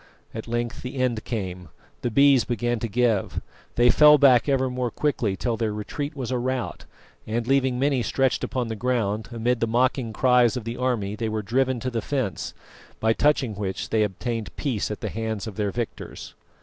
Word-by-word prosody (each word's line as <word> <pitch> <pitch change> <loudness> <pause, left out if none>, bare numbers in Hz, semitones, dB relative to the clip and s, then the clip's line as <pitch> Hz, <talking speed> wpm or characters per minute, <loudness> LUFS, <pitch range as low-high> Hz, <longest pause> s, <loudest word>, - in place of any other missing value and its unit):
At 110 0 -6
length 120 0 -2
the 125 +2 -6
end 125 -4 0
came; 90 -6 -4 0.3
the 120 - 0
Bees 140 +1 +5
began 120 0 -1
to 115 - -2
give, 115 -2 +1 0.4
they 120 0 +5
fell 150 0 +7
back 130 -2 +5
ever 130 -1 +2
more 125 -1 -2
quickly 115 -6 -1
till 120 -3 -1
their 110 -1 0
retreat 140 +8 -4
was 130 -3 -4
a 125 - 0
rout, 130 0 -3 0.4
and, 115 +2 -1
leaving 130 -1 +2
many 135 -1 +2
stretched 130 +3 +1
upon 125 -2 -2
the 110 - -3
ground, 110 -3 -1
amid 120 +1 0
the 115 - +1
mocking 120 0 +1
cries 125 0 +3
of 125 - -4
the 115 +2 -4
army 115 -6 -1
they 110 0 -2
were 110 0 -2
driven 130 +4 +1
to 130 - -2
the 115 -2 -1
fence, 130 -9 -3 0.4
by 110 0 +3
touching 135 -4 +2
which 100 -2 -4
they 110 - +2
obtained 105 +1 -3
peace 125 -9 -2
at 105 - -5
the - - -2
hands 110 -2 -3
of 110 -4 -7
their 105 -2 0
victors. 120 +2 -6
120 Hz, 195 wpm, -25 LUFS, 110-130 Hz, 0.4 s, fell